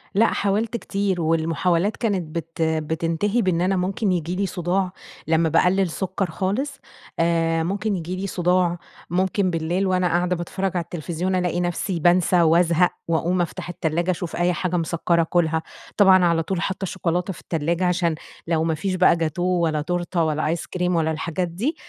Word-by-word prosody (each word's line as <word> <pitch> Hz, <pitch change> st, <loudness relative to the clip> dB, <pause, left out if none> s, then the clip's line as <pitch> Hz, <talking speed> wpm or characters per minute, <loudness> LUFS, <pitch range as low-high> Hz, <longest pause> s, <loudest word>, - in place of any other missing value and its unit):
لأ 225 Hz, +3 st, +5 dB
حاولت 215 Hz, +4 st, 0 dB
كتير 195 Hz, -4 st, -1 dB
والمحاولات 165 Hz, +4 st, +1 dB
كانت 185 Hz, -8 st, -2 dB
بت 165 Hz, 0 st, -5 dB
بتنتهي 160 Hz, +7 st, 0 dB
بإنّ 180 Hz, -3 st, +1 dB
أنا 190 Hz, +1 st, +2 dB
ممكن 190 Hz, +2 st, 0 dB
ييجي 175 Hz, 0 st, -1 dB
لي 200 Hz, +1 st, 0 dB
صداع 180 Hz, +1 st, -1 dB, 0.4 s
لمّا 160 Hz, 0 st, +3 dB
باقلل 180 Hz, +3 st, +3 dB
سكر 185 Hz, 0 st, -3 dB
خالص، 245 Hz, -, -2 dB, 0.4 s
آآ 165 Hz, -1 st, +2 dB
ممكن 200 Hz, +3 st, -1 dB
ييجي 175 Hz, +1 st, -4 dB
لي 195 Hz, +1 st, -3 dB
صداع، 180 Hz, -1 st, +1 dB, 0.3 s
ممكن 185 Hz, +2 st, +1 dB
بالليل 170 Hz, +4 st, 0 dB
وأنا 185 Hz, -1 st, +2 dB
قاعدة 175 Hz, +1 st, +1 dB
باتفرّج 190 Hz, +2 st, -3 dB
على 170 Hz, -, 0 dB
التلفزيون 175 Hz, +2 st, -3 dB
ألاقي 180 Hz, -1 st, 0 dB
نفسي 175 Hz, 0 st, -1 dB
بانسى 175 Hz, +1 st, +4 dB
وأزهق 170 Hz, +1 st, +4 dB, 0.2 s
وأقوم 175 Hz, +2 st, +1 dB
أفتح 175 Hz, +1 st, -4 dB
التلاجة 170 Hz, +1 st, -1 dB
أشوف 175 Hz, -1 st, -4 dB
أيّ 175 Hz, 0 st, +2 dB
حاجة 180 Hz, 0 st, -1 dB
مسَكَّرة 170 Hz, +1 st, +1 dB
آكلها. 160 Hz, -1 st, +1 dB, 0.3 s
طبعًا 190 Hz, -3 st, +6 dB
على 165 Hz, -1 st, +2 dB
طول 180 Hz, 0 st, -2 dB
حاطّة 190 Hz, 0 st, -2 dB
شوكولاتة 180 Hz, +1 st, -2 dB
في -, -, -13 dB
التلّاجة، 170 Hz, +3 st, -1 dB
عشان 175 Hz, -2 st, +1 dB, 0.3 s
لو 160 Hz, -1 st, +1 dB
ما 160 Hz, -1 st, 0 dB
فيش 185 Hz, +4 st, -2 dB
بقى 185 Hz, -1 st, +5 dB
جاتوه 175 Hz, +3 st, 0 dB
ولا 155 Hz, -2 st, +1 dB
تورتة 175 Hz, +1 st, -1 dB
ولا 155 Hz, -1 st, 0 dB
آيس 165 Hz, +1 st, -2 dB
كريم 180 Hz, -1 st, -1 dB
ولا 160 Hz, -1 st, +1 dB
الحاجات 170 Hz, +3 st, -2 dB
دي، 230 Hz, -, -2 dB
175 Hz, 170 wpm, -23 LUFS, 165-185 Hz, 0.4 s, طبعًا